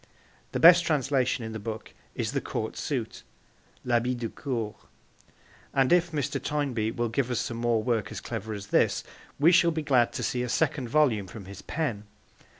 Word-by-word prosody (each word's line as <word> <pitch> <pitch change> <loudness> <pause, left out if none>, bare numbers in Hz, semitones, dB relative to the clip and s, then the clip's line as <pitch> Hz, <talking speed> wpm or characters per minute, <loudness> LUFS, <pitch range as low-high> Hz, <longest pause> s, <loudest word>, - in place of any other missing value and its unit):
The - - -2
best 170 +1 +8
translation 135 -5 +1
in 110 - -5
the 110 - -5
book 110 +1 -6 0.2
is - - -2
The - - -1
Court - - -4
Suit - - -3 0.6
(L'Habit 125 +1 +1
de 115 -2 -3
Cour), 115 -7 -3 1.0
and 135 +2 +4
if 175 0 +3
Mr. 145 -4 -2
Toynbee 135 -7 -1
will 120 +1 -1
give 120 +3 -1
us 120 -2 0
some 115 - -4
more 115 -2 +1
work 115 -3 0
as 105 - -5
clever 110 -1 -5
as 100 0 -8
this - - +3 0.4
we 160 +4 +6
shall 170 -1 +5
be 160 -1 -2
glad 130 -5 +3
to - - -3
see 125 - -1
a 125 - -2
second 140 -2 0
volume 120 -8 +2
from 100 +2 -10
his 95 0 -10
pen. 125 -10 -3
125 Hz, 185 wpm, -27 LUFS, 110-145 Hz, 1.0 s, best